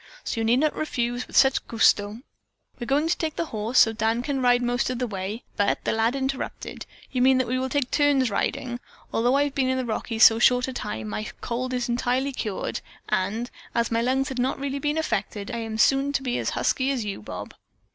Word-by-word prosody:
So - - -3
you - - 0
need 235 +2 +4
not 305 -1 +1
refuse 245 -5 -2
with - - -4
such 265 -1 +4
gusto! 215 -1 +2 0.6
We're 240 - -5
going 290 +4 +2
to 335 - +2
take 315 -2 -3
the 335 - -1
horse, 225 -2 -3
so 225 - +7
that 225 - -13
Dan 225 +2 +1
can 275 -1 -1
ride 245 -1 +4
most 245 0 0
of 255 - -2
the 250 - -1
way." 205 +1 -5
But 205 - +1
that - - 0
lad 225 +3 +1
interrupted: 270 0 -4 0.2
"You 250 - 0
mean 260 +1 +5
that 260 - +2
we 255 +2 0
will 260 0 -2
take 280 -2 -1
turns 285 -5 +3
riding. 240 +4 -2 0.3
Although 245 +3 +2
I 285 - +4
have 290 -1 -2
been 265 -2 +1
in 260 - +1
the 260 - -1
Rockies 225 0 0
so 225 0 +8
short 250 +1 +4
a 260 - -4
time 110 - -4
my 105 +1 -3 0.2
cold 250 +2 -3
is 250 -1 -1
entirely 250 +3 0
cured, 215 -6 -3 0.3
and, 215 +6 -1 0.2
as 235 0 +1
my 230 0 +2
lungs 260 +2 +1
had 260 -1 -4
not 255 +2 0
really 280 0 -3
been 295 +2 -1
affected, 210 -8 -2
I 235 - -3
am 225 -1 -4
soon 275 +5 +3
to 275 - 0
be 245 -2 -1
as - - -1
husky 265 0 +1
as 255 -6 -1
you, 200 - -4
Bob." - - -7
245 Hz, 235 wpm, -25 LUFS, 225-265 Hz, 0.6 s, so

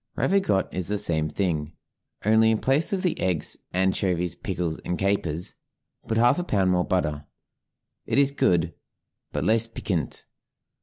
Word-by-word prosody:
Ravigotte 190 - +1
is 90 -2 -1
the 105 - 0
same 80 -5 +3
thing, 85 -5 -2 0.5
only 110 +1 +4
in 110 - +2
place 135 +7 +3
of 190 -2 -1
the 180 - -1
eggs, 90 -4 0
anchovies, 90 -2 0
pickles, 85 -4 -4
and 90 - -4
capers, 95 -4 -1 0.5
put 110 - -1
half 120 +7 +4
a - - -1
pound 95 - +1
more 90 -1 +2
butter; 75 -5 -2 0.8
it - - 0
is 140 0 +5
good, 85 - +1 0.6
but - - -2
less 115 +1 +3
piquant. 90 - -4
95 Hz, 150 wpm, -25 LUFS, 85-110 Hz, 0.8 s, is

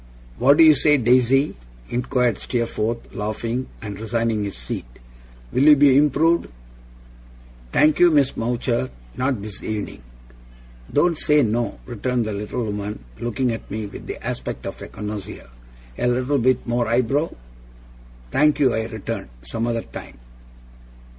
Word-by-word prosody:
'What 140 +3 +5
do - - +8
you 155 -1 +9
say, 150 +1 +4
Daisy?' 130 +3 +3 0.3
inquired 125 -2 0
Steerforth, 115 -1 -2
laughing, 115 +4 -3 0.2
and 105 -2 -6
resigning 115 -1 -1
his 100 - -5
seat. - - -5 0.6
'Will - - +1
you 150 +1 +8
be 140 -2 +5
improved?' 150 +4 +3 1.2
'Thank 155 0 +4
you, 175 - +7
Miss 145 -4 +3
Mowcher, 120 +2 -1 0.3
not 130 -5 -1
this 105 -1 -7
evening.' 105 -10 -4 0.9
'Don't 165 +2 +2
say 150 -1 +4
no,' 115 +1 -1
returned 120 0 -1
the 110 - -3
little 105 +4 -3
woman, 105 - -5
looking 120 +1 -1
at 115 - -6
me 110 +1 -4
with 100 - -9
the - - -5
aspect - - -4
of - - -6
a - - -7
connoisseur; 105 -7 -7 0.5
'a - - +1
little 130 +3 +1
bit 130 +1 +2
more 120 -1 0
eyebrow?' 125 +7 +1 1.0
'Thank 150 - +3
you,' 135 -5 +3
I 110 0 -1
returned, 110 - -5
'some 110 - -3
other 115 -1 -1
time. - - -10
120 Hz, 145 wpm, -22 LUFS, 110-135 Hz, 1.2 s, you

